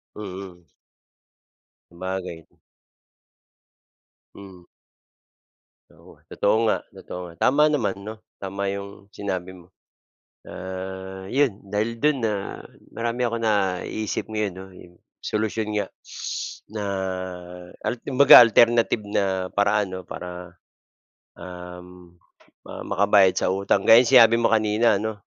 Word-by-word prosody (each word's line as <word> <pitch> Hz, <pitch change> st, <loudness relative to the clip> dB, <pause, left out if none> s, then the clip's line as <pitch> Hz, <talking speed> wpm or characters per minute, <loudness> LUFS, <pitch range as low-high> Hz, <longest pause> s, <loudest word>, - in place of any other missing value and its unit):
Mm. 95 Hz, -3 st, -8 dB, 1.3 s
Sabagay. 90 Hz, -2 st, -6 dB, 1.9 s
Mm. 95 Hz, -3 st, -13 dB, 1.3 s
Oo, -, -, -18 dB, 0.2 s
totoo 105 Hz, +2 st, +1 dB
nga, -, -, +2 dB, 0.2 s
totoo 90 Hz, -, -8 dB
nga. 85 Hz, -, -12 dB
Tama 150 Hz, +4 st, +4 dB
naman 125 Hz, -11 st, 0 dB
'no. 110 Hz, -, -5 dB, 0.2 s
Tama 100 Hz, 0 st, -3 dB
'yong 100 Hz, 0 st, -8 dB
sinabi 95 Hz, -3 st, -4 dB
mo. 90 Hz, -2 st, -15 dB, 0.8 s
Ah, 95 Hz, +1 st, -7 dB
'yon 135 Hz, -6 st, +2 dB, 0.2 s
dahil 110 Hz, +3 st, -1 dB
do'n 150 Hz, +3 st, +1 dB
na 110 Hz, -, +1 dB, 0.6 s
marami 120 Hz, +1 st, -3 dB
akong 115 Hz, -1 st, -2 dB
naiisip 100 Hz, 0 st, -1 dB
ngayon 105 Hz, -3 st, -2 dB
'no, 95 Hz, 0 st, -9 dB
yung 90 Hz, -1 st, -15 dB, 0.3 s
solusyon 110 Hz, 0 st, -2 dB
nga 105 Hz, -, 0 dB, 0.8 s
na 105 Hz, -2 st, -4 dB, 1.0 s
al -, -, 0 dB
kumbaga 140 Hz, 0 st, +8 dB
alternative 115 Hz, -1 st, +3 dB
na 95 Hz, -2 st, -1 dB
paraan 100 Hz, 0 st, +1 dB
'no 95 Hz, -, -5 dB
para, 90 Hz, 0 st, -8 dB, 0.9 s
um, 90 Hz, 0 st, -11 dB, 0.5 s
ma -, -, -8 dB
makabayad 100 Hz, -1 st, +4 dB
sa -, -, 0 dB
utang. 100 Hz, 0 st, +1 dB
Gaya 115 Hz, +2 st, +8 dB
no'ng 120 Hz, -, -2 dB
sinabi 115 Hz, -2 st, +8 dB
mo 115 Hz, -, +2 dB
kanina 110 Hz, 0 st, +2 dB
ano, 105 Hz, -1 st, -5 dB
100 Hz, 110 wpm, -23 LUFS, 95-110 Hz, 1.9 s, kumbaga